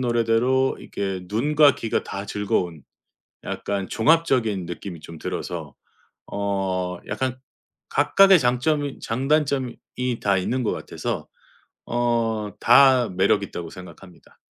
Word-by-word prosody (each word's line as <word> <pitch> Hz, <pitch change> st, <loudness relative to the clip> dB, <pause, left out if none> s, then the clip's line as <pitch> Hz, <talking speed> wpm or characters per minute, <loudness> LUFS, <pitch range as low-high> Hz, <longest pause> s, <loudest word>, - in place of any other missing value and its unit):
노래대로 120 Hz, +2 st, +2 dB
이렇게 95 Hz, -2 st, -4 dB
눈과 145 Hz, +6 st, +4 dB
귀가 115 Hz, -, -2 dB
다 100 Hz, +1 st, -5 dB
즐거운 90 Hz, -6 st, -2 dB, 0.6 s
약간 100 Hz, -2 st, -3 dB
종합적인 120 Hz, -, +2 dB
느낌이 85 Hz, 0 st, -7 dB
좀 80 Hz, +1 st, -11 dB
들어서 -, -, -5 dB, 0.6 s
어 95 Hz, -3 st, -2 dB
약간 130 Hz, -1 st, -2 dB, 0.5 s
각각의 195 Hz, -3 st, +5 dB
장점이 135 Hz, +3 st, 0 dB
장단점이 135 Hz, 0 st, 0 dB, 0.2 s
이 125 Hz, -2 st, -1 dB
다 100 Hz, -2 st, +2 dB
있는 125 Hz, +8 st, -1 dB
것 110 Hz, -, 0 dB
같아서 -, -, -4 dB, 0.6 s
어 115 Hz, -3 st, -1 dB
다 130 Hz, -1 st, +6 dB
매력 95 Hz, +2 st, +2 dB
있다고 85 Hz, -4 st, -6 dB
생각합니다. 90 Hz, 0 st, -14 dB
115 Hz, 250 characters per minute, -23 LUFS, 95-130 Hz, 0.6 s, 다